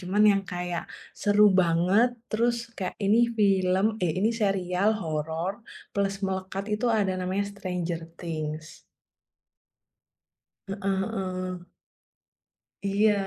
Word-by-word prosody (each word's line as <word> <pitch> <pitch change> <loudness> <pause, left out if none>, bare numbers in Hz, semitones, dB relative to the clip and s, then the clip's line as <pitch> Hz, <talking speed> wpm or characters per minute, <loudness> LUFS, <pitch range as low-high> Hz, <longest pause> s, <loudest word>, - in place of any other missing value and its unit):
cuman 190 +3 +1
yang 195 0 0
kayak 175 -1 -3 0.4
seru 205 +1 +4 0.2
banget 180 +7 +4 0.2
terus 235 +2 +2 0.2
kayak 185 -2 -3
ini 210 +4 +4 0.2
film 190 -1 +3 0.2
eh 170 - +2
ini 215 +4 +3
serial 195 0 +2
horor 160 +3 -2 0.4
plus 200 -1 +1
melekat 190 +1 -3
itu 220 +4 -1
ada 195 -2 +1
namanya 185 +2 0
Stranger 180 -4 -3 0.2
Things. 155 -2 -5 1.9
Heeh 195 -1 -1
heeh. 185 -2 -4 1.2
Iya. 205 +2 +3
190 Hz, 105 wpm, -27 LUFS, 180-200 Hz, 1.9 s, seru